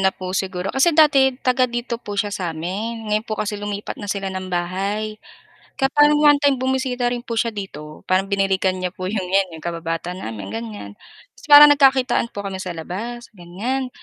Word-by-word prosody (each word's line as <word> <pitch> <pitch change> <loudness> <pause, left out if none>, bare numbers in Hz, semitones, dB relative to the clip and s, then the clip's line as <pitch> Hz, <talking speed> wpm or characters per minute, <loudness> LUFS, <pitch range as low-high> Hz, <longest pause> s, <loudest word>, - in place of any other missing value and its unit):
na 190 - +4
po 185 0 -6
siguro, 190 -1 -2
kasi 300 +4 +3
dati 275 -4 +5
taga-dito 245 -2 -1
po 205 -4 -7
siya 205 0 -1
sa'min, 190 +6 -4
ngayon 215 +1 +1
po 215 - -2
kasi 210 -1 -3
lumipat 205 0 -5
na 205 - -7
sila 195 -1 -3
ng 185 0 -5
bahay. 195 +5 -3 0.6
Kaya 270 -1 +2
parang 295 0 +5
one 290 -1 +6
time 285 -1 +3
bumisita 260 -2 0
rin 245 0 -4
po 235 - -5
siya 230 +1 +1
dito, 155 -8 -9
parang 190 +1 +1
binalikan 195 -1 +1
niya 185 0 -3
po 185 0 -5
'yong, 200 -3 -2
'yan 195 -1 +2
'yong - - -14
kababata 165 +1 -3
namin, 110 - -7
ganiyan, 105 -3 -6 0.4
ta's 320 - -17
parang 295 0 +11
nagkakitaan 265 -4 +3
po 200 0 -6
kami 190 -1 -5
sa 185 -2 -5
labas, 230 +9 -6
ganiyan. 225 +10 -4
205 Hz, 190 wpm, -21 LUFS, 185-245 Hz, 0.6 s, parang